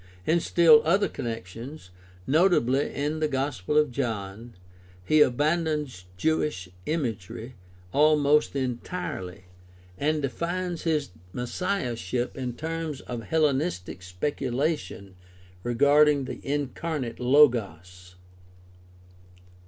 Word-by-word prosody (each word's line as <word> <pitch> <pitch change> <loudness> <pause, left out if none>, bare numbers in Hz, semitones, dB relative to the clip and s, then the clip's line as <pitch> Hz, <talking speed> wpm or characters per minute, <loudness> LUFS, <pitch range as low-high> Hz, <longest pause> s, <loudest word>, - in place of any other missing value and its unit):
In 170 +2 +3
still 165 -2 +6
other 195 +6 +3
connections, 115 +1 -7 0.3
notably 145 -4 +3
in 150 +2 -2
the 155 - +1
Gospel 135 -3 -1
of 150 -3 +3
John, 115 -3 -4 0.5
he 155 +8 +4
abandons 150 - +1
Jewish 150 -6 0 0.2
imagery 120 - -3 0.4
almost 150 0 +4
entirely 120 - -4 0.6
and 150 +1 0
defines 175 +5 -3
his 150 - 0 0.2
messiahship 125 - -2
in 125 -2 -4
terms 160 0 -4
of 120 -2 -6
Hellenistic 145 - 0
speculation 125 - -3 0.4
regarding 145 +4 +4
the - - -7
incarnate 145 -2 -3
Logos. 95 - +2
140 Hz, 90 wpm, -26 LUFS, 115-155 Hz, 0.6 s, still